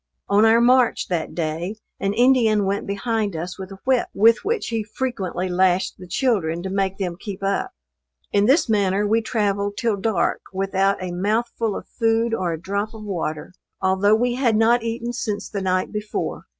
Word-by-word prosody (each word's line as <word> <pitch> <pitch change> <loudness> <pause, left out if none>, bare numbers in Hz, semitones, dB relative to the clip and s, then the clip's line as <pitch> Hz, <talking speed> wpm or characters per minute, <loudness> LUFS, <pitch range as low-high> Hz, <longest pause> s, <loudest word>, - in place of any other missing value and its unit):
On 205 +2 +4
our 225 +1 +5
march 250 0 +3
that 170 -3 -2
day, 170 +4 -2 0.2
an 195 +1 -1
Indian 230 -4 +4
went 200 +1 -2
behind 205 -1 -1
us 175 +4 -5
with 190 0 -7
a 195 - -9
whip, 260 -2 +2
with 225 +3 +5
which 455 +3 -1
he 225 -2 -1
frequently 205 -6 -3
lashed 185 +1 +1
the 180 - -10
children 175 -6 0
to 190 - -4
make 195 -1 -1
them 180 -3 -3
keep 200 -2 -7
up. 195 0 -1 0.6
In 205 +1 +3
this 310 +4 +4
manner 205 -2 +1
we 220 +2 +2
travelled 205 -2 -1
till 230 -4 0
dark 200 -2 0
without 195 0 +1
a 180 - -4
mouthful 215 +4 -1
of - - -6
food 225 0 +1
or 185 -6 0
a 165 - -4
drop 200 +5 -3
of 215 - -9
water; 170 -5 -4 0.3
although 190 +2 +3
we 245 +2 +1
had 245 -3 +1
not 230 +2 +4
eaten 230 +1 -3
since 210 -3 -3
the 200 - -4
night 185 -1 0
before. 210 0 -4
205 Hz, 185 wpm, -22 LUFS, 190-230 Hz, 0.6 s, our